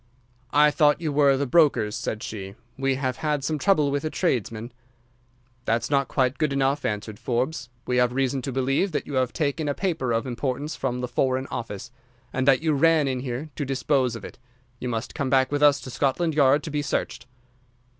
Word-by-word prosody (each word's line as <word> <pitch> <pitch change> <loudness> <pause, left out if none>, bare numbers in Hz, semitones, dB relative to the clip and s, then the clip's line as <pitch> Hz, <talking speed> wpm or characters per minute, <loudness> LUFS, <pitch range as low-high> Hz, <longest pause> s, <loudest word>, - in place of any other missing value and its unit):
"'I 150 +2 +5
thought 150 0 +3
you 155 -3 -2
were 140 -2 +4
the 140 - 0
brokers,' 135 -7 +3
said 110 -2 -4
she, 100 -2 -6 0.2
'we 135 0 0
have 130 -2 -2
had 150 -3 -1
some 155 +2 -1
trouble 150 -2 +3
with 140 0 -1
a 155 - -1
tradesman.' 120 - -2 0.9
"'That's 115 +5 0
not 140 -1 +2
quite 130 -1 0
good 155 -2 +1
enough,' 140 +1 0
answered 105 0 -3
Forbes. 125 +1 -2 0.2
'We 125 - 0
have 125 -1 +3
reason 135 +1 0
to 135 - -4
believe 135 +8 0
that - - -1
you 145 - -7
have 130 -2 +1
taken 150 0 -1
a 140 - -1
paper 160 -10 -1
of 115 +2 0
importance 130 +4 -3
from 125 0 -2
the 125 - -2
Foreign 130 +2 0
Office, 115 +1 -5 0.4
and 130 +1 -1
that 135 +2 +4
you 160 -2 +2
ran 155 0 +4
in 130 -1 -1
here 130 +4 -5
to 145 - -3
dispose 130 -2 0
of 115 - -8
it. - - -11 0.4
You 125 - -3
must 115 +1 -3
come 140 -3 -2
back 130 0 +3
with 145 0 0
us 145 -1 +5
to 130 - -8
Scotland 150 +6 0
Yard 145 0 +4
to 155 - -6
be 150 0 -1
searched. 135 -2 -3
135 Hz, 205 wpm, -25 LUFS, 125-145 Hz, 0.9 s, I